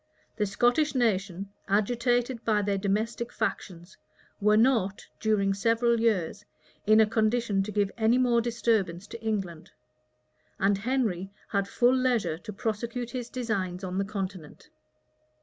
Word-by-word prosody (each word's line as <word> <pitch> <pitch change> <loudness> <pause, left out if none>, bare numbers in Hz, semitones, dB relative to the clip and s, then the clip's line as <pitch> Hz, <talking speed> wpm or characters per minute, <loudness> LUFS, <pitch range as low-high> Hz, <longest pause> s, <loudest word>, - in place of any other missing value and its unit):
The 210 -2 0
Scottish 245 +8 +2
nation, 200 -5 0 0.2
agitated 240 +4 +1
by 210 -2 +2
their 200 -1 0
domestic 215 +4 -1
factions, 175 -1 -4 0.4
were 210 +1 +4
not, 220 -5 +2
during 205 -3 +1
several 230 +3 +2
years, 210 -3 0 0.4
in 215 +1 +6
a 220 - +7
condition 220 -1 +1
to 205 +2 -4
give 205 -1 0
any 225 +2 +4
more 245 -2 +3
disturbance 220 -6 0
to 230 +2 -9
England; 195 -7 -3 0.9
and 195 0 +2
Henry 215 -6 -1 0.2
had 200 -2 0
full 245 +4 +3
leisure 240 -11 +1
to 215 +3 -8
prosecute 230 +3 -3
his 245 -2 -5
designs 195 -7 -3
on 185 0 -3
the - - +1
continent. 195 -6 -6
215 Hz, 135 wpm, -28 LUFS, 195-235 Hz, 0.9 s, a